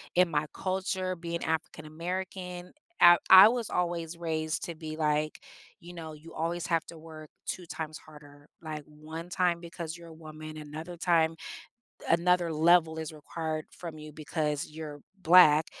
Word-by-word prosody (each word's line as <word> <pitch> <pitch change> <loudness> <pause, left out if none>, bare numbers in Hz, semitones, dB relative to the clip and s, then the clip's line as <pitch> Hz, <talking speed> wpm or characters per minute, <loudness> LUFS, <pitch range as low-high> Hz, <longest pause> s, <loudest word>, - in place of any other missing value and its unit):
in 180 -1 +5
my 150 -1 0
culture, 185 0 -2
being 170 0 -4
African 160 -1 -3
American, 180 +2 -5 0.3
I 175 0 +9
I 190 +3 +11
was 235 -2 -2
always 170 -2 -2
raised 160 -2 -2
to 170 - -6
be, 155 -1 -7
like, 150 -1 0 0.4
you 175 +1 -11
know, 160 -2 -8
you 155 +2 -13
always 170 +1 -2
have 165 -2 +1
to 170 - -11
work 155 -1 -11 0.2
2 180 - -4
times 155 -1 -6
harder. 145 -1 -16 0.2
Like 155 -1 -6
1 155 +2 -9
time, 175 -1 +1
because 170 -1 -7
you're 170 -1 -13
a 165 - -11
woman, 155 -1 -10
another 155 +3 -7
time 165 -2 +2 0.7
another 170 0 +3
level 160 0 +4
is 160 -1 -5
required 155 0 -5
from 165 -3 -8
you, 155 0 -10
because 150 -1 -2
you're 155 -1 -8 0.2
black. 160 -3 +7
160 Hz, 160 wpm, -29 LUFS, 155-175 Hz, 0.7 s, I